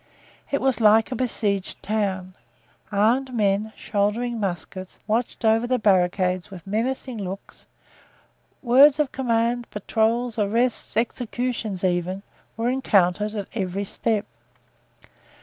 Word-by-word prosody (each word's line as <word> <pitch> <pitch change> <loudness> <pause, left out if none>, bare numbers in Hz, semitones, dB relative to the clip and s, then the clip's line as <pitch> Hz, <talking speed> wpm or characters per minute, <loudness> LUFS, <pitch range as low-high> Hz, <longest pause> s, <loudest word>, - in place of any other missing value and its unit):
It 280 - 0
was 260 -3 +1
like 220 +2 +5
a - - -1
besieged 210 -5 -1
town. 190 -3 -2 0.6
Armed 240 +6 +2
men, 210 0 +1
shouldering 225 +3 -1
muskets, 185 -1 -5
watched 225 +2 -1
over 225 +2 +3
the 255 0 +2
barricades 185 -3 +2
with 185 -4 -11
menacing 235 +4 -2
looks; 195 0 -8 1.0
words 270 +4 +6
of 295 -3 +1
command, 235 -1 0
patrols, 225 +3 0
arrests, 230 +4 0
executions, 235 -4 -2
even, 185 +1 0 0.3
were 230 +2 0
encountered 210 -5 +2
at 205 -2 -4
every 195 -2 -2
step. 215 +1 -1
220 Hz, 115 wpm, -24 LUFS, 195-240 Hz, 1.0 s, words